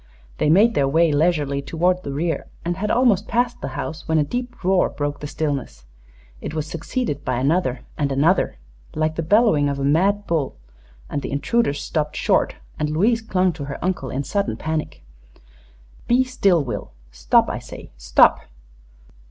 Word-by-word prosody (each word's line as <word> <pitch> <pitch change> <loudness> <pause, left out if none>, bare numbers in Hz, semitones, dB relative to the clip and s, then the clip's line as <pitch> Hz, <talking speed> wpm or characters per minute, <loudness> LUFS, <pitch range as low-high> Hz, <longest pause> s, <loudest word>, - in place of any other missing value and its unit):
They - - +2
made 210 +8 +5
their 140 -7 +2
way 165 +3 +3
leisurely 145 -2 +1
toward 175 +6 0
the 140 - -6
rear 160 +4 -2 0.2
and 175 +1 -1
had 205 +3 -3
almost 230 -5 +3
passed 240 0 0
the - - -3
house, 160 0 -5
when 160 0 +2
a 150 - +4
deep 245 - -5
roar 185 0 +3
broke 145 -1 -3
the 145 - -5
stillness. 140 - -4 0.6
It 155 - -5
was 155 -1 -2
succeeded 165 - -3
by 130 - -1
another, 135 -1 0 0.2
and 140 -2 0
another, 145 - +2 0.4
like 155 0 0
the 165 - -1
bellowing 165 -5 +3
of 140 - -2
a 140 - -3
mad 195 +8 +2
bull, 160 -7 -1 0.5
and 145 - -3
the - - -5
intruders 145 +1 0
stopped 150 -2 -2
short - - +1 0.2
and 150 - 0
Louise 215 +10 +2
clung 185 -4 +1
to 145 -2 -6
her 140 - -5
uncle 180 -8 -2
in 135 +2 -2
sudden 200 +6 -1
panic. 155 -1 -4 1.0
"Be 245 +2 +4
still, 200 - +2
Will! 125 - -6 0.2
Stop, - - +3
I - - -3
say - - -11
stop!" - - +4
160 Hz, 175 wpm, -22 LUFS, 140-190 Hz, 1.0 s, made